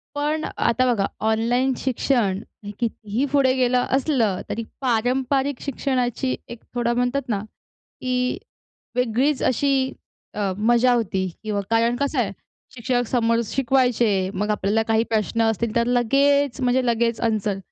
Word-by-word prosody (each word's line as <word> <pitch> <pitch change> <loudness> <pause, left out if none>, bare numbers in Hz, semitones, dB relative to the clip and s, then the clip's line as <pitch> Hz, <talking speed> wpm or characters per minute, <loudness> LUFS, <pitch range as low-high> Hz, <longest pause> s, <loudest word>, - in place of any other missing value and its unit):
पण 300 +2 -1
आता 235 +2 +2
बघा, 195 -3 0 0.2
ऑनलाईन 240 +4 +2
शिक्षण 235 -6 0 0.2
हे 205 - -6
कितीही 230 +1 -2
पुढे 270 -3 +4
गेलं 250 -1 +2
असलं 245 -9 +1
तरी 230 - -3 0.2
पारंपरिक 260 +3 0
शिक्षणाची 255 -2 -1
एक 235 -1 -9 0.2
थोडा 240 0 +1
म्हणतात 245 +3 0
ना, 205 - 0 0.6
की 250 0 0 0.6
वेगळीच 250 +4 +1
अशी 265 +1 +1 0.4
अ, 200 -2 -1
मजा 240 +3 +3
होती 190 -5 0 0.2
किंवा 205 -2 -1
कारण 230 +1 +2
कसं 280 +2 -1
आहे? - - 0 0.4
शिक्षक 245 0 0
समोर 230 -2 +2
शिकवायचे. 240 -7 +1
मग 210 +3 -2
आपल्याला 210 +2 +1
काही 225 0 +2
प्रश्न 225 +1 0
असतील 225 0 0
तर 235 0 +2
लगेच, 275 +3 +2
म्हणजे 250 0 +2
लगेच 235 -1 +1
अन्सर, 215 -3 0
240 Hz, 135 wpm, -23 LUFS, 220-260 Hz, 0.6 s, पुढे